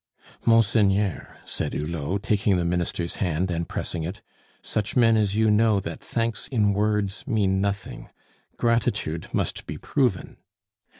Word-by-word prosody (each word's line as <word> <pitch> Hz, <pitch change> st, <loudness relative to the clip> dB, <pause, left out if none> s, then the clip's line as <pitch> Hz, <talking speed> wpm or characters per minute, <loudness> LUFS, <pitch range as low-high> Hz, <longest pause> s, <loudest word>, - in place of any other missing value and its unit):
"Monseigneur," 105 Hz, -4 st, +2 dB
said -, -, -3 dB
Hulot, 80 Hz, +5 st, -2 dB
taking 100 Hz, -2 st, +2 dB
the 85 Hz, -, 0 dB
Minister's 85 Hz, 0 st, -1 dB
hand 90 Hz, 0 st, 0 dB
and 85 Hz, 0 st, -2 dB
pressing 85 Hz, -, -3 dB
it, 90 Hz, +5 st, -6 dB, 0.4 s
"such 105 Hz, -1 st, -2 dB
men 115 Hz, -3 st, +5 dB
as 105 Hz, -2 st, +1 dB
you 110 Hz, 0 st, +3 dB
know 105 Hz, -1 st, +4 dB
that 85 Hz, -4 st, -6 dB
thanks 115 Hz, -1 st, -2 dB
in 105 Hz, -6 st, +2 dB
words 105 Hz, -1 st, 0 dB
mean 100 Hz, -6 st, +1 dB
nothing; 100 Hz, -1 st, -3 dB, 0.5 s
gratitude 110 Hz, -9 st, 0 dB
must -, -, -2 dB
be -, -, -5 dB
proven." 125 Hz, -9 st, -1 dB
100 Hz, 135 wpm, -25 LUFS, 90-110 Hz, 0.5 s, men